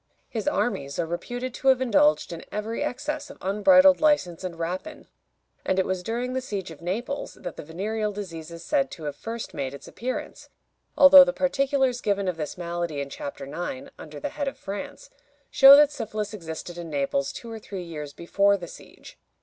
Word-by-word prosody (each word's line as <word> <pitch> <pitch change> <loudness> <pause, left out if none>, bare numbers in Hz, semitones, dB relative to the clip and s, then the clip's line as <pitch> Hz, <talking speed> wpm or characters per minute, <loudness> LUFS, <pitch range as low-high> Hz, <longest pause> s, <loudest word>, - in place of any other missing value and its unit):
His 230 -2 -4
armies 140 - -1
are 170 - 0
reputed 245 +9 -4
to 270 - -4
have 260 -1 +6
indulged 290 - +3
in 165 - -8
every 215 +2 -3
excess 290 +3 -4
of - - -11
unbridled 275 +9 +5
license 240 - +2
and 175 -3 -5
rapine; 185 - -5 0.6
and 190 - 0
it 190 - +2
was 185 -1 -2
during 240 +6 -3
the 260 - -1
siege 200 -8 -5
of 160 - -12
Naples 230 +11 -4
that 175 - -7
the - - -7
venereal 210 +7 -3
disease 175 -6 -7
is 170 0 -10
said 275 -3 +1
to 165 - -10
have 145 -2 -4
first 230 +7 -6
made 135 0 -4
its 140 - -12
appearance, 255 +2 -5 0.5
although 280 0 +10
the 270 - 0
particulars 275 -2 +1
given 200 -1 0
of 180 -2 -1
this 150 +1 -5
malady 170 -3 -3
in 140 0 -5
Chapter 140 0 -6
IX., 140 -2 -6
under 150 -2 -9
the - - -3
head 285 - -4
of 275 - -4
France, 280 - -7 0.4
show 275 0 +10
that 295 0 +6
syphilis 215 -6 -4
existed 175 -2 -7
in 170 -1 -7
Naples 140 -1 -1
two 235 - -9
or 225 - -6
three 195 -3 -7
years 150 -4 -7
before 200 +6 +2
the 175 -2 -8
siege. - - -14
200 Hz, 195 wpm, -25 LUFS, 170-260 Hz, 0.6 s, although